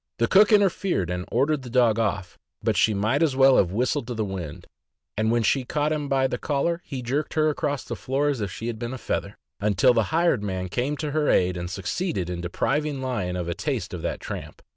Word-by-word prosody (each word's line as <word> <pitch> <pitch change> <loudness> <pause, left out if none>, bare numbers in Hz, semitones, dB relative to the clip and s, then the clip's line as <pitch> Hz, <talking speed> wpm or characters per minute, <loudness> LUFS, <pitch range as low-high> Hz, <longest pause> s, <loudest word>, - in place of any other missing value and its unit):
The 115 - +2
cook 205 - +5
interfered 190 - +2
and 90 0 -4
ordered 140 +4 +1
the 125 - -9
dog 120 -2 +3
off, 100 -4 -2 0.2
but - - +1
she 110 - +3
might 110 +8 +1
as 155 -5 +2
well 135 0 +6
have 90 - +3
whistled 125 +4 0
to 120 - -4
the 110 -1 -1
wind; 90 -7 -6 0.5
and 110 +1 +1
when 115 0 +2
she 130 +5 +2
caught 150 +4 -1
him 150 -2 -3
by 135 -1 +2
the 130 - -1
collar, 165 +4 -1
he 130 -3 -6
jerked 140 +6 -2
her 155 0 +3
across 145 -2 -2
the - - -5
floor 135 +3 -1
as 135 -6 -2
if 100 -3 -3
she 115 - -7
had 115 -2 -3
been 120 +3 -4
a - - -6
feather, - - -3 0.2
until 105 +5 +3
the 115 -3 +2
hired 165 -8 +2
man 95 -2 -3
came 130 +8 -1
to 150 -1 -3
her 150 0 +1
aid 90 0 +3
and 90 0 -4
suc 95 +1 -7
ceeded 100 - -2
in 85 -1 -4
depriving 145 - -1
Lion 120 -9 -2
of 90 -2 -3
a 85 - -1
taste - - -3
of - - -5
that - - -3
tramp. - - -7
125 Hz, 240 wpm, -25 LUFS, 100-145 Hz, 0.5 s, well